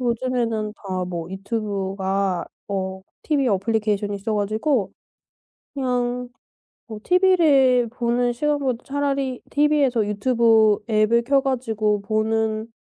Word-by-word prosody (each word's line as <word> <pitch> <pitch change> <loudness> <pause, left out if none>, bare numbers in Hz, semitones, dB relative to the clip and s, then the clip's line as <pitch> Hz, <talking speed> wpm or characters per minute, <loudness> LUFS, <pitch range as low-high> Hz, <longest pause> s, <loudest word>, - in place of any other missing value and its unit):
요즘에는 235 -3 -1
다 185 -3 -4
뭐 170 -1 -5
유튜브가 195 -2 -2 0.2
어 190 -1 -3 0.2
티브이 285 -4 +1
애플리케이션이 205 0 0
있어 215 +2 -3
가지고 215 +3 0 0.8
그냥 250 -2 -2 0.6
뭐 215 -2 -8
티브이를 300 -10 +4
보는 240 0 0
시간보다 275 -2 -1
차라리 275 -2 -2
티브이에서 285 -6 +2
유튜브 220 0 +3
앱을 220 +2 +3
켜가지고 235 -6 0
보는 220 +1 -1
225 Hz, 270 characters per minute, -22 LUFS, 205-255 Hz, 0.8 s, 티브이를